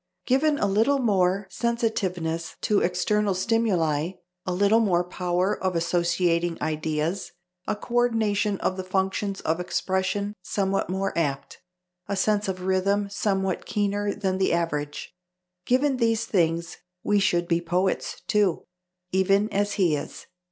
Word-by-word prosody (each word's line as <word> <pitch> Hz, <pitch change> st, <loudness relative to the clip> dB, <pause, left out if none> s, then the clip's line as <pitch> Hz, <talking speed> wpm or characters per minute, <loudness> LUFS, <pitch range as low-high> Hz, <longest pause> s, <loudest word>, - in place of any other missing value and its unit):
Given 290 Hz, +3 st, +2 dB
a -, -, +1 dB
little 220 Hz, +8 st, +3 dB
more 195 Hz, -5 st, +2 dB
sensitiveness 185 Hz, -9 st, -1 dB
to 210 Hz, -2 st, +2 dB
external 195 Hz, +3 st, +1 dB
stimuli, 185 Hz, -7 st, +1 dB, 0.3 s
a -, -, 0 dB
little 200 Hz, +5 st, +3 dB
more 180 Hz, -6 st, +2 dB
power 180 Hz, +2 st, -1 dB
of 185 Hz, -1 st, 0 dB
associating 170 Hz, 0 st, +1 dB
ideas, 155 Hz, +4 st, -2 dB, 0.3 s
a -, -, 0 dB
co 225 Hz, +3 st, -10 dB
ordination 220 Hz, -4 st, +2 dB
of 185 Hz, -, 0 dB
the 185 Hz, -, -3 dB
functions 190 Hz, +1 st, -1 dB
of 160 Hz, +2 st, 0 dB
expression 190 Hz, +3 st, -1 dB
somewhat 195 Hz, 0 st, -1 dB
more 195 Hz, +1 st, -2 dB
apt, 140 Hz, -5 st, -2 dB, 0.5 s
a 200 Hz, -, -1 dB
sense 210 Hz, +1 st, +1 dB
of 185 Hz, -1 st, -3 dB
rhythm 195 Hz, +2 st, +1 dB
somewhat 195 Hz, -2 st, -1 dB
keener 205 Hz, 0 st, 0 dB
than 190 Hz, -2 st, -1 dB
the 190 Hz, -, +2 dB
average 150 Hz, -4 st, -2 dB, 0.5 s
given 265 Hz, +2 st, +2 dB
these 230 Hz, -2 st, +1 dB
things 170 Hz, -3 st, 0 dB, 0.3 s
we 205 Hz, 0 st, +2 dB
should 175 Hz, -3 st, +1 dB
be 170 Hz, 0 st, +1 dB
poets, 180 Hz, +3 st, -1 dB
too, 205 Hz, -5 st, +1 dB, 0.5 s
even 195 Hz, +3 st, +2 dB
as 205 Hz, +1 st, +1 dB
he 180 Hz, -6 st, +2 dB
is.... 145 Hz, -, -7 dB
190 Hz, 135 wpm, -25 LUFS, 175-205 Hz, 0.5 s, little